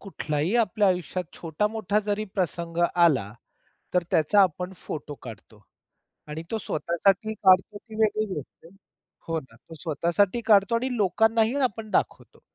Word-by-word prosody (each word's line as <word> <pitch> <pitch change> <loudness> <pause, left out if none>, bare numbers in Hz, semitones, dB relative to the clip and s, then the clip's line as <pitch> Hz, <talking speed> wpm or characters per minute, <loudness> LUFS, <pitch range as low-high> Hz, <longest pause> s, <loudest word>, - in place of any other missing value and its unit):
कुठलाही 160 -2 -2
आपल्या 210 -3 +2
आयुष्यात 180 0 -1
छोटा-मोठा 210 +5 -1
जरी 210 +1 -1
प्रसंग 170 -2 -2 0.2
आला, 145 - +3 0.6
तर 180 - +3
त्याचा 165 +6 +4
आपण 180 +1 -1
फोटो 150 -3 -7
काढतो 110 -2 -12 0.7
आणि 150 +2 -6
तो 225 - 0
स्वतःसाठी 190 +7 0
काढतो 195 0 +3
ती 220 +1 -13
वेगळी 215 0 +2
गोष्ट 150 +1 -9
आहे 175 +4 -16 0.5
हो 165 -1 -1
ना, 130 -6 -18
तो 135 +7 -15
स्वतःसाठी 170 +7 0
काढतो 205 0 +4
आणि 250 +2 -1
लोकांनाही 220 +4 +2
आपण 215 +1 -9
दाखवतो. - - -2
185 Hz, 140 wpm, -26 LUFS, 160-215 Hz, 0.7 s, त्याचा